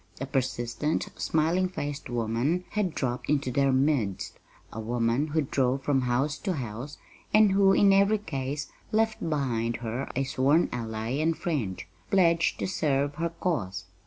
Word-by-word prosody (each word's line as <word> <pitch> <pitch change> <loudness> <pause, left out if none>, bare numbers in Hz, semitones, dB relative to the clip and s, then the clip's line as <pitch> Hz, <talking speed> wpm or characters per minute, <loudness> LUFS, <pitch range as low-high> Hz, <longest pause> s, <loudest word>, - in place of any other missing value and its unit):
A 135 - -2
persistent, 130 +2 -1
smiling 165 +4 +1
faced 145 -6 -5
woman 120 +9 0
had 205 -6 -1
dropped 125 -1 -2
into 140 -3 +1
their 140 +1 +2
midst 130 -8 0 0.3
a 110 - -5
woman 115 +5 0
who 155 +1 +1
drove 135 0 0
from 135 -2 +2
house 130 +4 0
to 190 - -1
house, 125 0 -6 0.4
and 215 -2 +6
who, 195 0 +5
in 195 0 +5
every 200 +2 +4
case, 145 -6 -4 0.2
left 220 0 +1
behind 120 -7 -1
her 120 +5 -3
a 135 - +1
sworn 135 +5 +2
ally 110 -2 -4
and 160 +2 +1
friend, 125 - -2 0.3
pledged 170 -3 +3
to - - -2
serve 145 -6 0
her 170 0 0
cause. 105 - -3
140 Hz, 155 wpm, -27 LUFS, 120-165 Hz, 0.4 s, and